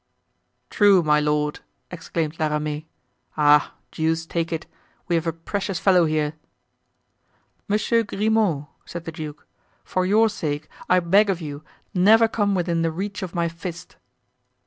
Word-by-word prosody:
"True, 200 -4 +5
my 150 -1 +3
lord!" 150 0 0 0.3
exclaimed 165 -2 -4
La 155 - +2
Ramee. 150 0 -3 0.5
"Ah! 150 -1 +4 0.2
deuce 160 +1 -1
take 165 0 -2
it! 160 -1 -3 0.4
we 175 - -1
have 165 0 +1
a - - +2
precious 190 +3 -4
fellow 180 -3 +4
here!" 155 -1 0 1.3
"Monsieur 215 +2 +2
Grimaud!" 210 -8 0 0.2
said 170 -1 -8
the 165 - -5
duke, 155 -2 -8 0.4
"for 185 - -1
your 215 +4 +4
sake 155 -8 -3 0.2
I 180 0 +5
beg 200 +5 +4
of 185 -3 0
you, 145 -2 -7 0.3
never 220 +5 +5
come 205 -3 0
within 170 -2 0
the 165 - +1
reach 195 +4 -5
of 185 -1 -6
my 170 -1 +1
fist!" 170 +1 -8
170 Hz, 145 wpm, -23 LUFS, 155-195 Hz, 1.3 s, True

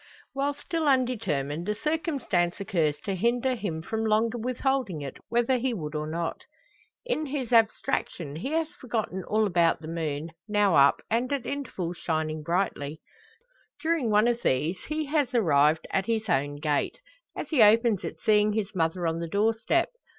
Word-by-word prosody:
While 280 +1 -1
still 315 +2 -2
undetermined, 205 - 0
a 210 - 0
circumstance 275 - -1
occurs 170 -8 0
to 205 -3 -3
hinder 240 +6 +1
him 185 -9 -4
from 220 +4 -2
longer 220 +2 +1
withholding 250 - -1
it, 135 - -7
whether 240 +2 +2
he 250 -1 -1
would 150 -5 -5
or 150 0 -3
not. 165 +1 -3 0.6
In 310 -12 -1
his 265 -4 -3
abstraction 180 -8 +1
he 225 +12 -4
has 325 -1 +1
forgotten 230 - -4
all 215 +3 +1
about 170 -4 +2
the 160 - -9
moon, 160 -1 -3 0.2
now 205 -3 +3
up, 140 0 +5
and 240 +4 +1
at 275 -4 -1
intervals 190 -12 -4
shining 155 -1 -2
brightly. 160 -3 -1 0.8
During 320 -7 0
one 210 +2 +4
of 240 0 0
these 155 +8 0
he 310 0 -2
has 285 -4 0
arrived 155 -6 +3
at 190 0 0
his 220 -1 0
own 145 -5 +1
gate, 145 0 -1 0.4
as - - -5
he 300 -7 +3
opens 220 -1 +5
it - - -4
seeing 210 -1 +4
his 205 -2 -2
mother 170 0 0
on 165 0 0
the 170 - -3
door 210 +5 +2
step. 285 +10 +1
210 Hz, 170 wpm, -27 LUFS, 165-250 Hz, 0.8 s, up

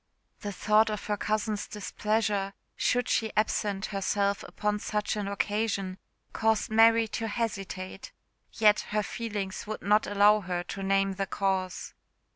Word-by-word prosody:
The 205 - -4
thoughts 215 +3 +3
of 210 -1 -4
her 210 - 0
cousin's 215 0 -1
displeasure, 210 -1 -1 0.2
should 245 -1 +1
she 220 -1 +1
absent 210 -2 0
herself 200 0 0
upon 210 0 -1
such 210 0 -1
an 205 -2 -3
occasion, 200 -2 -1 0.3
caused 220 -1 +1
Mary 225 +1 +6
to 225 +1 -3
hesitate; 195 -4 -4 0.4
yet 210 -1 +5
her 210 0 0
feelings 205 -3 -4
would 215 - -5
not 210 +1 +3
allow 205 +1 +5
her 180 -3 -3
to 195 +2 -6
name 195 0 +2
the 195 +1 -3
cause. 190 -1 -2
210 Hz, 140 wpm, -28 LUFS, 195-215 Hz, 0.4 s, Mary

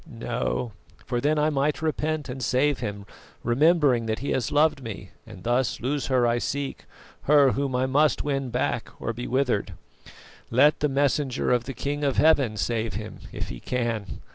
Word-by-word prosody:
No; 120 0 -3 0.3
for 120 -1 -1
then 150 +3 +2
I 150 +1 +2
might 145 +2 0
repent 155 -1 -1
and 130 0 -6
save 130 +4 +1
him, 100 -1 -5 0.4
remembering 135 -2 +3
that 110 0 -1
he 140 - -3
has 125 -4 -1
loved 150 -1 +3
me, 105 -5 -8 0.2
and 95 -5 -11
thus 120 +1 0
lose 135 +2 -2
her 130 -2 +3
I 120 0 +2
seek, 140 +2 -4 0.4
her 140 -2 +6
whom 135 -1 -1
I 130 +1 +2
must 145 +3 +2
win 135 -3 -1
back 120 -1 -1
or 115 - -3
be 120 +2 -5
withered. 125 -7 0 0.8
Let 140 +6 +4
the 150 - +1
messenger 140 -1 +1
of 120 -1 +2
the 135 - -6
King 145 +4 -3
of 140 -2 0
Heaven 140 -9 +4
save 110 -1 -1
him, 110 +1 -6
if - - -5
he - - -7
can. 115 - -3
130 Hz, 180 wpm, -25 LUFS, 120-145 Hz, 0.8 s, her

